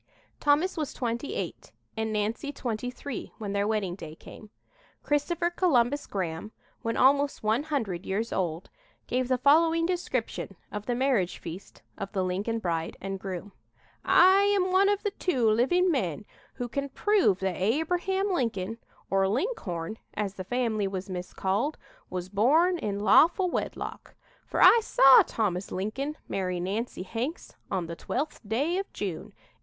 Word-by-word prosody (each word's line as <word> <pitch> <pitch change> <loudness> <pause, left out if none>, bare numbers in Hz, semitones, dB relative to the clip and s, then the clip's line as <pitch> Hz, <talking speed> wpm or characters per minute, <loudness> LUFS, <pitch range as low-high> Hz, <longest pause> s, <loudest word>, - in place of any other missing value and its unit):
Thomas 300 +6 +2
was 305 -3 -3
twenty 240 +2 -3
eight - - -5 0.2
and 220 -1 -2
Nancy 215 +7 -1
twenty 245 -3 -3
three 265 +2 -7
when 205 -3 -4
their 200 0 +1
wedding 210 -5 0
day 160 -4 -9
came. 215 +5 -13 0.5
Christopher 340 +4 0
Columbus 285 -6 +2
Graham, 185 +1 -4 0.3
when 230 0 -2
almost 280 +1 +3
one 220 +4 +2
hundred 230 - -2
years 215 +4 -1
old, 170 -2 -2 0.3
gave 255 0 -1
the 255 0 +2
following 325 +5 +4
description 260 - -2 0.2
of 210 0 -6
the 245 - 0
marriage 245 -8 +1
feast 175 +4 -9 0.2
of 195 -1 -5
the 190 -2 0
Lincoln 195 +5 -1
bride 165 -6 -2
and 195 0 -4
groom: 190 +1 -6 0.5
"I 380 +2 +6
am 395 -2 +2
one 390 +2 +5
of 410 0 0
the 410 - 0
two 270 - 0
living 310 +12 +3
men 205 - -1 0.3
who 245 -2 -3
can 280 +4 -3
prove 390 - +2
that 190 -2 0
Abraham 355 - +1
Lincoln, 225 - -2 0.3
or 195 0 +3
Linkhorn, 215 - -2 0.2
as 205 -2 -2
the 190 - -6
family 225 -2 0
was 190 0 -5
miscalled, 190 +9 -2 0.3
was 180 -1 -4
born 305 - +3
in 205 -8 -2
lawful 345 - +5
wedlock, - - -4 0.3
for - - +2
I 470 - +9
saw 270 -10 +7
Thomas 195 -4 -2
Lincoln 265 +11 -3
marry 180 -2 -2
Nancy 195 +3 -3
Hanks 240 - -4 0.2
on 185 -3 -1
the 170 0 -6
12th 285 - -3
day 290 - 0
of 390 - -5
June, 180 -6 -4
1806. - - -31
230 Hz, 155 wpm, -28 LUFS, 195-295 Hz, 0.5 s, I